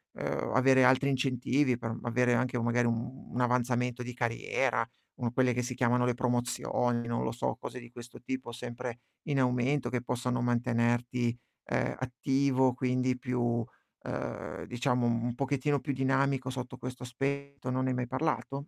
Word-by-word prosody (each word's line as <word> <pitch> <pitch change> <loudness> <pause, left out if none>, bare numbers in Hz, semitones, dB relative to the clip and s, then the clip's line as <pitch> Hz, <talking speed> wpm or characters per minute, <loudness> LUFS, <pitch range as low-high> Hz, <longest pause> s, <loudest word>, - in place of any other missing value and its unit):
ehm, - - -2
o - - -2
avere 130 0 +5
altri 130 +2 +5
incentivi 130 0 +2
per 115 -1 -4
avere 120 +1 +2
anche 125 0 +1
magari, 120 +1 +2
uhm, 120 +3 -3
un 125 - -2
avanzamento 125 0 +1
di 125 0 -6
carriera, 120 0 0 0.3
uhm, 120 -3 -2
quelle 125 0 +3
che 125 - 0
si 125 +1 -4
chiamano 125 -1 +3
le 125 - +2
promozioni, 120 -1 0
non 115 0 -1
lo - - -1
so, 120 - -1
cose 125 - -7
di 120 -1 -11
questo 120 0 -11
tipo, 130 -1 -4
sempre 120 0 -6 0.3
in 140 -2 +2
aumento, 125 +2 +2
che 125 -1 -1
possano 125 0 -1
mantenerti, 120 0 +1 0.3
ehm, - - 0
attivo, 130 +1 +2
quindi 125 0 +1
più, 120 -2 0 0.4
ehm, - - -4
diciamo 125 0 0
un 120 +1 0
pochettino 140 +2 +1
più 140 - -3
dinamico 135 0 +1
sotto 125 -1 -5
questo 125 0 -7
aspetto, 140 +2 -3
non 130 +1 0
ne - - +1
hai - - 0
mai 125 0 -1
parlato? 135 +2 -1
125 Hz, 165 wpm, -31 LUFS, 120-130 Hz, 0.4 s, avere